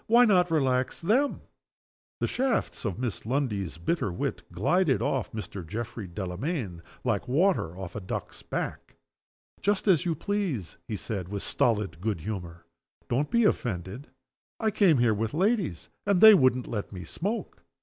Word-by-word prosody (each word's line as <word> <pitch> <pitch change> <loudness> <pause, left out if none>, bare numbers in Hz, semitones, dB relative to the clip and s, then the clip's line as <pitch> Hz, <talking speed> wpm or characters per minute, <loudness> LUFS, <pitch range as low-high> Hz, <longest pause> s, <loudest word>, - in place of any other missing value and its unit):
Why 240 +2 +7
not 180 -5 +4
relax 130 -5 +1
them?" 250 +11 +1 0.8
The - - +2
shafts 255 - -1
of 100 -4 -2
Miss 120 -4 -3
Lundie's 110 - -1
bitter 95 - -1
wit 85 - -3
glided 135 - +2
off 130 -5 -1
Mr. 105 -3 -6
Geoffrey 110 +3 -5
Delamayn 95 - -4 0.2
like 110 -6 0
water 135 - +2
off 95 -3 -7
a - - -2
duck's 90 - -5
back. - - -5 0.7
"Just 205 +1 +1
as 180 -6 +5
you 170 -3 0
please," 175 - -2
he 110 - -3
said, 95 -3 -4
with 100 -1 -3
stolid 105 - 0
good 105 -5 -1
humor. 90 -3 -6 0.4
"Don't 135 +5 +1
be 235 0 +3
offended. 110 - -1 0.5
I 220 -2 +1
came 195 -7 +4
here 120 -2 +4
with 110 +5 -2
ladies 190 - 0 0.2
and 200 -3 +4
they 220 +2 +11
wouldn't 130 -8 +4
let 105 -4 -4
me 90 -3 -7
smoke. 200 - -4
125 Hz, 155 wpm, -28 LUFS, -, 0.8 s, they